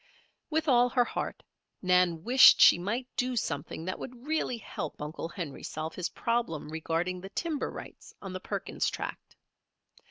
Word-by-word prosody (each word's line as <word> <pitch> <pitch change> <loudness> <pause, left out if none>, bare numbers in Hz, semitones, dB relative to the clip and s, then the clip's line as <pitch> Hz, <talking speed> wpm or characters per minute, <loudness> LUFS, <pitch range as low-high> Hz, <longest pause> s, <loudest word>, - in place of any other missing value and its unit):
With 315 0 0
all 245 -2 +5
her 245 0 +3
heart, - - -4 0.4
Nan 180 -3 +3
wished 255 +4 +8
she - - +8
might 230 +8 -2
do 250 -1 0
something 160 -5 -3
that 185 - -3
would 250 0 -9
really 310 -5 -1
help 220 - -6
Uncle 155 +2 -5
Henry 165 -6 -6
solve 155 +1 -5
his 180 - -3
problem 230 -11 -2
regarding 165 +3 -2
the 195 - -8
timber 315 - -2
rights - - -10
on 195 -2 -7
the 185 - -4
Perkins - - -2
Tract. - - -6
185 Hz, 160 wpm, -29 LUFS, 165-245 Hz, 0.4 s, wished